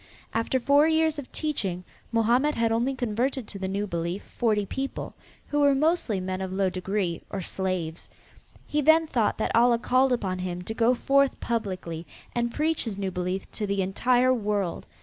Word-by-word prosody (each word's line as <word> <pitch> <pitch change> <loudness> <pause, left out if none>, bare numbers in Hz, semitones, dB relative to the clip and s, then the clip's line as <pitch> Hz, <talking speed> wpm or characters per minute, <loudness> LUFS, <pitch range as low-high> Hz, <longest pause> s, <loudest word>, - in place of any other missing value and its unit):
After 230 +3 +1
four 285 +4 +4
years 320 -1 +2
of 270 - -9
teaching 195 - -2 0.3
Mohammed 240 +6 +3
had 230 -1 +1
only 240 +4 +1
converted 245 +1 -1
to 200 - -8
the 190 - -2
new 200 +2 -1
belief 170 0 -3
forty 215 -4 +1
people, 270 +7 -4 0.4
who 295 - 0
were 285 -1 +5
mostly 300 - +1
men 185 0 -3
of 190 -1 -3
low 190 0 +1
degree 185 -2 -2
or 195 -2 -4
slaves. 180 -3 -3 0.6
He 300 - 0
then 315 +3 +5
thought 235 -8 0
that 220 - -1
Allah 235 0 +5
called 255 +2 +2
upon 190 -7 -1
him 180 -1 -4
to 220 - -4
go 235 +2 +3
forth 275 +2 +2
publicly 185 -8 -3 0.3
and 235 0 0
preach 315 +2 0
his 215 -4 -4
new 195 -1 -2
belief 180 +1 -3
to 210 - -3
the 200 -1 0
entire 245 +6 +3
world. 205 -6 -2
225 Hz, 180 wpm, -26 LUFS, 190-265 Hz, 0.6 s, were